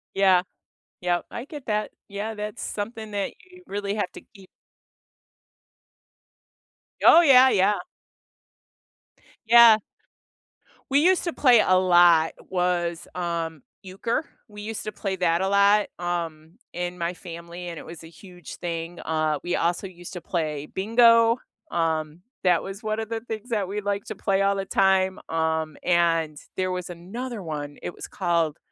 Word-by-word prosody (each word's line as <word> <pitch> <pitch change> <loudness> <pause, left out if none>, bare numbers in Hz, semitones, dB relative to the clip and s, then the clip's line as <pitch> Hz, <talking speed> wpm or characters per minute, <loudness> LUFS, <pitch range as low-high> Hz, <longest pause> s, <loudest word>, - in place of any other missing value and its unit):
Yeah, 190 -2 +4 0.6
yep, 175 -1 0
I 235 - -6
get 295 -3 -10
that. 215 -1 -1 0.2
Yeah, 205 +2 -4
that's 210 +2 -6
something 220 +1 -5
that 200 -1 -2 0.2
you 365 0 -16
really 200 0 -3
have 205 - -2
to - - -10
keep 195 -3 -16 2.6
Oh, 340 - +9
yeah, 265 -4 +7
yeah. 200 0 +3 1.7
Yeah. 230 -1 +8 1.1
We 280 - +4
used 365 +3 +3
to 340 - -2
play 245 -5 +5
a 185 0 +4
lot 175 -3 +5 0.2
was, 175 -2 -1
um, 165 -4 -3 0.2
euchre. 200 +10 -3 0.2
We 210 -1 -11
used 220 +1 -5
to 215 - -4
play 195 -1 -3
that 170 0 +1
a 190 - +1
lot, 200 +1 +4
um, 170 0 -4 0.2
in 175 +1 -4
my 170 +1 -2
family, 170 0 -9
and 170 -2 -6
it - - -11
was 165 -1 -10
a 160 - -10
huge 180 +1 -12
thing, 170 0 -5
uh, 155 -2 -1
we 175 - -1
also 175 +3 0
used 175 0 -11
to 180 - -6
play 150 -4 -3
bingo, 230 +3 +4 0.3
um, 160 -1 -1 0.2
that 175 -3 +3
was 195 +3 -8
one 215 0 -2
of 220 - -4
the 225 0 -4
things 225 +1 -7
that 205 -5 -1
we 210 +1 -3
like 200 0 -2
to - - -7
play 195 0 0
all 200 0 +2
the 195 0 -3
time, 190 -1 +2
um, 160 -1 -1
and 165 -3 +2 0.2
there 185 0 0
was 180 -1 -4
another 210 +7 -6
one, 145 -2 -6
it - - -5
was - - -9
called 170 -4 0
185 Hz, 155 wpm, -25 LUFS, 170-210 Hz, 2.6 s, Oh